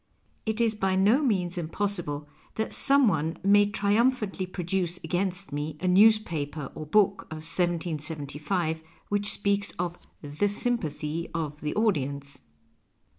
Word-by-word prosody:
It 220 +1 0
is 230 -2 +3
by 195 -3 0
no 205 +9 +4
means 185 - 0
impossible 165 -4 -2 0.3
that 220 - -2
some 275 -2 +4
one 160 -3 0
may 205 +1 +5
triumphantly 205 -1 +1
produce 180 -1 -2
against 185 +3 -2
me 150 +1 -3
a 185 - -2
newspaper 180 -8 +3
or 155 - -7
book 200 +3 +3
of 155 0 -7
1775 160 -1 -2 0.3
which 205 0 +1
speaks 200 0 0
of 175 0 -3 0.2
" - - -42 0.2
the 205 - +3
sympathy 165 -8 -1
of 150 -2 -3
the 150 - -3
audience." 140 -10 -1
180 Hz, 130 wpm, -27 LUFS, 155-205 Hz, 0.3 s, may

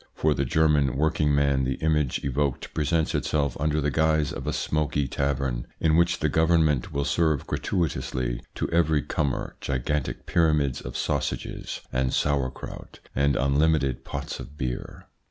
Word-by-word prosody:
For 75 -1 +2
the 70 - -1
German 75 -2 +2
working 75 -1 +2
man 70 -2 +2
the 65 0 0
image 75 -5 0
evoked 70 0 -1
presents 80 +1 +1
itself 70 -4 0
under 75 +1 +1
the 75 0 0
guise 80 -1 +2
of - - -6
a - - +1
smoky 75 -2 0
tavern 65 -2 -1
in 80 -1 +3
which 85 +1 +3
the - - +3
Government 80 -4 +2
will 70 0 -1
serve 80 -3 +1
gratuitously 65 -8 -2
to - - -1
every 80 -3 +3
comer 70 -4 -2
gigantic 70 +1 -2
pyramids 75 -6 +2
of - - -6
sausages - - -3
and 65 0 +1
sauerkraut 70 -3 -2 0.2
and 70 0 +2
unlimited 70 -1 +2
pots - - -5
of 75 - -10
beer. 60 -3 -4
75 Hz, 150 wpm, -26 LUFS, 65-80 Hz, 0.2 s, in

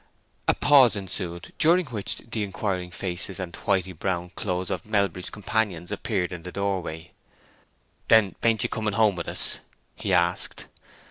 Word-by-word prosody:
A - - +4
pause 135 -6 +6
ensued, 90 -3 -5
during 175 +3 +5
which 110 -8 -2
the 115 -1 -5
inquiring 95 -2 -2
faces 90 +1 -3
and 90 -2 -5
whity 95 -2 0
brown 90 +1 -2
clothes 90 0 -2
of - - -2
Melbury's 100 -4 0
companions 105 -4 -1
appeared 100 -3 -1
in 90 -2 -6
the 90 +2 -7
door 100 -1 0
way. 80 -1 -7 1.0
"Then 110 -5 +5
bain't 115 -3 +3
you - - 0
coming 110 -2 -1
home 105 -3 +4
with 85 - -5
us?" - - -2 0.4
he 100 - -3
asked. 90 -1 +1
95 Hz, 155 wpm, -26 LUFS, 90-110 Hz, 1.0 s, pause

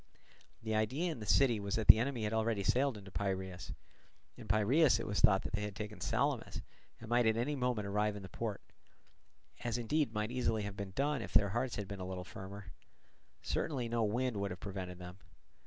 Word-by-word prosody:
The 110 -1 -2
idea 130 +11 +1
in 155 - -6
the 105 - -7
city 120 -3 +4
was 100 -1 -2
that 110 -2 -1
the - - +10
enemy 120 -1 -1
had 105 +1 -1
already 110 -2 +1
sailed 130 +4 +2
into 95 -1 -11
Piraeus: 95 -2 -3 0.6
in - - -11
Piraeus 120 - +4
it - - -4
was 105 - -1
thought 95 -1 +5
that - - -5
they 105 - 0
had 105 -1 -4
taken 105 0 -6
Salamis - - -1 0.4
and 115 - -10
might 120 0 +3
at 110 0 +3
any 135 +6 0
moment 125 -5 0
arrive 105 +1 0
in 100 - -7
the - - -7
port; 105 +3 -4 1.0
as 120 -1 -1
indeed 140 +3 +1
might 105 +1 -2
easily 115 -4 0
have 100 -1 -5
been 100 -2 -6
done 140 -1 +1
if - - -7
their 100 - +5
hearts 120 +4 -1
had 105 -2 -4
been 100 0 -6
a 90 - -4
little 95 -1 -4
firmer: 95 0 -9 0.7
certainly 130 -6 -1
no 115 0 0
wind 120 +2 0
would 100 0 -1
have 90 -1 -6
prevented 95 -2 -5
them. 90 +1 -10
105 Hz, 210 wpm, -34 LUFS, 100-120 Hz, 1.0 s, the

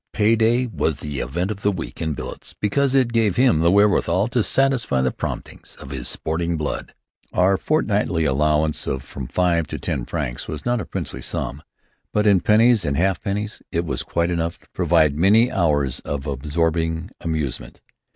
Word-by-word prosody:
Pay 110 +2 +3
day 115 +3 +3
was 80 - -1
the 75 -1 -5
event 85 - -2
of 105 -1 -6
the 105 - +2
week 85 -3 -6
in 80 -2 -1
billets - - -6
because 135 +6 +1
it 125 -3 +3
gave 110 -5 +2
him 125 -9 +4
the 85 +1 +4
wherewithal 100 +1 +3
to 120 -1 +1
satisfy 130 - +2
the 65 0 +1
promptings - - -6
of 65 - -11
his 65 -3 -4
sporting 85 +1 -1
blood. 75 -1 -4 0.4
Our 95 +2 +4
fortnightly 100 - 0
allowance 75 +2 +1
of 65 -1 -2
from 65 -3 -7
five 85 +2 +1
to - - -5
ten - - -3
francs - - -4
was 75 -2 -6
not 120 -2 +1
a - - -6
princely - - -5
sum; 70 - -4 0.5
but 105 0 +1
in 100 -3 +5
pennies 115 +1 +4
and 70 -3 -1
halfpennies, 100 +3 -1
it 85 -1 -1
was 65 -6 -3
quite 85 +1 -1
enough 85 -1 -2
to - - -26
provide 80 -4 +3
many 110 +7 +5
hours 75 -8 +1
of 70 -1 -5
absorbing 80 +4 -1
amusement. 80 -5 -3
85 Hz, 180 wpm, -22 LUFS, 75-105 Hz, 0.5 s, in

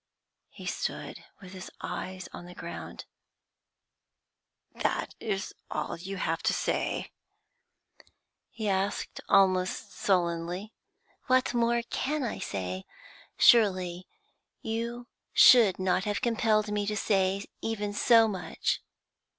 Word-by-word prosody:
He - - -12
stood - - -4 0.2
with 185 -1 -11
his 185 -1 -8
eyes 185 +1 -5
on 175 - -9
the 180 - -11
ground. - - -7 1.7
'That - - -1
is 200 -2 -3 0.2
all 155 +2 -3
you 190 +3 -6
have 165 -2 -1
to - - +1
say?' - - -1 1.4
he 220 -2 -5
asked, 195 +1 -1
almost 190 +1 +3
sullenly. 175 +2 -1 0.5
'What 255 -1 +3
more 235 0 +2
can 290 +5 -2
I 235 - -3
say? 95 -1 -4 0.5
Surely 185 -5 +4 0.6
you 235 +2 -3 0.3
should 230 -8 +7
not 185 0 +1
have 205 -1 -1
compelled 220 -3 +1
me 205 -1 -1
to 210 0 -1
say 195 -1 +1 0.2
even 210 -2 -2
so 225 +2 +5
much. 190 -5 -2
200 Hz, 110 wpm, -29 LUFS, 185-225 Hz, 1.7 s, should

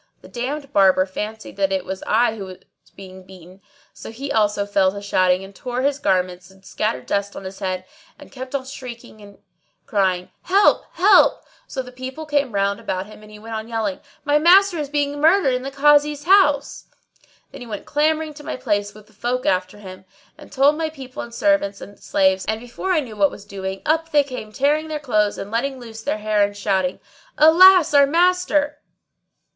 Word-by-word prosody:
The - - -12
damned 275 +3 -5
Barber 190 -1 +4
fancied 210 +2 -7
that 195 -1 +1
it 190 -1 -1
was 190 0 -6
I 225 0 +2
who 200 -3 -7
was 185 -1 -10 0.4
being 190 -1 -12
beaten; 185 0 -15 0.3
so - - -10
he 270 +5 -6
also 210 -2 +1
fell 195 -2 +2
to 200 - -7
shouting 185 -2 +1
and 195 0 -13
tore 250 +3 -4
his 285 0 0
garments 180 -6 -1
and 190 0 -21
scattered 215 +3 -3
dust 200 0 -2
on - - -8
his 190 0 -9
head 185 -2 -3 0.3
and 295 - -15
kept 260 0 -7
on 265 -2 -3
shrieking 245 -5 -10
and 200 -1 -15 0.5
crying 185 -3 0
"Help! 395 +3 +3
Help 395 +4 +4
!" - - -33
So 260 - -4
the 250 - -12
people 260 +5 -7
came 285 -5 0
round 200 0 0
about 185 0 -4
him 215 +1 -14
and 215 - -15
he 210 - -12
went 225 +2 -9
on 220 0 -5
yelling, 220 -4 -3 0.3
"My 295 +1 +3
master 360 +2 +5
is 290 -2 -4
being 290 0 -2
murdered 320 -3 +4
in 250 - -1
the 270 - -5
Kazi's 290 +1 +3
house!" 295 -7 +3 0.7
Then 275 - -11
he 245 - -9
ran 210 -3 -6
clamouring 310 +1 0
to 295 0 -12
my - - -4
place 205 -5 -2
with 215 -1 -15
the 215 - -25
folk 245 +5 -3
after 185 -7 0
him, 190 -2 -11 0.3
and - - -15
told 285 +3 +3
my 320 -1 -1
people 265 -5 -9
and 235 - -9
servants 235 -6 +1
and 205 0 -12
slaves; 190 -1 +1
and, 220 0 -1
before 245 +11 -5
I 330 -4 +2
knew 235 -6 -9
what 200 -2 +3
was 200 - -12
doing, 195 -1 -6
up 325 +1 +1
they 295 -2 +4
came 250 -6 -8
tearing 295 +7 0
their 310 -1 -4
clothes 215 -7 0
and 200 - -7
letting 260 +3 -2
loose 225 -2 -10
their 220 - -2
hair[FN#629] 210 -1 +1
and 205 0 -12
shouting, 190 -2 -1 0.4
"Alas, 340 +2 +7
our 280 -1 +6
master!" 325 -3 +1
230 Hz, 205 wpm, -21 LUFS, 200-290 Hz, 0.7 s, Alas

